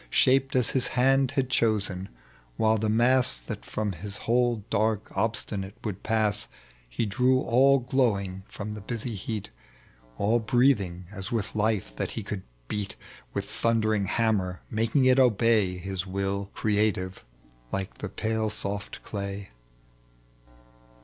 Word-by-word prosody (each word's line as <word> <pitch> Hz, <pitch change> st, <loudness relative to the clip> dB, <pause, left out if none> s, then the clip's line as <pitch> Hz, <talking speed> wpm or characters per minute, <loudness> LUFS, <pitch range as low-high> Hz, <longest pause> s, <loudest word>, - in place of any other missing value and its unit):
i; -, -, -22 dB
Shaped 135 Hz, -, +3 dB
aa 125 Hz, -, +4 dB
his 130 Hz, +2 st, +1 dB
hand 135 Hz, +1 st, +4 dB
had 130 Hz, -1 st, +2 dB
chosen, 100 Hz, -6 st, +1 dB, 0.5 s
while 110 Hz, 0 st, +3 dB
the 110 Hz, 0 st, 0 dB
mass 120 Hz, -, +3 dB
That -, -, -6 dB
fVom 105 Hz, -2 st, -3 dB
his 100 Hz, +4 st, -5 dB
hold, 120 Hz, -2 st, +1 dB
dark, 110 Hz, -1 st, 0 dB
obstinate, 100 Hz, -2 st, -2 dB
would 100 Hz, -4 st, -4 dB
pass, 110 Hz, -2 st, +1 dB, 0.4 s
He -, -, -1 dB
drew 125 Hz, +5 st, +3 dB
all 135 Hz, +3 st, +5 dB
glowing 115 Hz, -8 st, 0 dB
from 105 Hz, +1 st, -6 dB
the 105 Hz, -, -7 dB
basy 115 Hz, +3 st, -4 dB
heat. 105 Hz, +1 st, -5 dB, 0.7 s
All 110 Hz, +4 st, +2 dB
breathing 110 Hz, -6 st, +2 dB
as 95 Hz, -1 st, -5 dB
with 110 Hz, -2 st, -1 dB
life 105 Hz, -, 0 dB
that -, -, -1 dB
he 110 Hz, -, -2 dB
could 100 Hz, -1 st, -4 dB, 0.3 s
beat 100 Hz, +4 st, -3 dB, 0.4 s
With -, -, -1 dB
thundering 110 Hz, -3 st, +1 dB
hammer, 95 Hz, -4 st, 0 dB
making 115 Hz, +5 st, +2 dB
it 130 Hz, +1 st, +5 dB
obey 110 Hz, -6 st, +3 dB
His 95 Hz, 0 st, -4 dB
will 100 Hz, +1 st, -2 dB
creative, 105 Hz, -3 st, 0 dB, 0.5 s
like 95 Hz, -1 st, -4 dB
the 105 Hz, -, -4 dB
pale 110 Hz, +2 st, -1 dB
soft 100 Hz, -1 st, -4 dB
clay. 100 Hz, -1 st, -5 dB
110 Hz, 140 wpm, -27 LUFS, 100-115 Hz, 0.7 s, all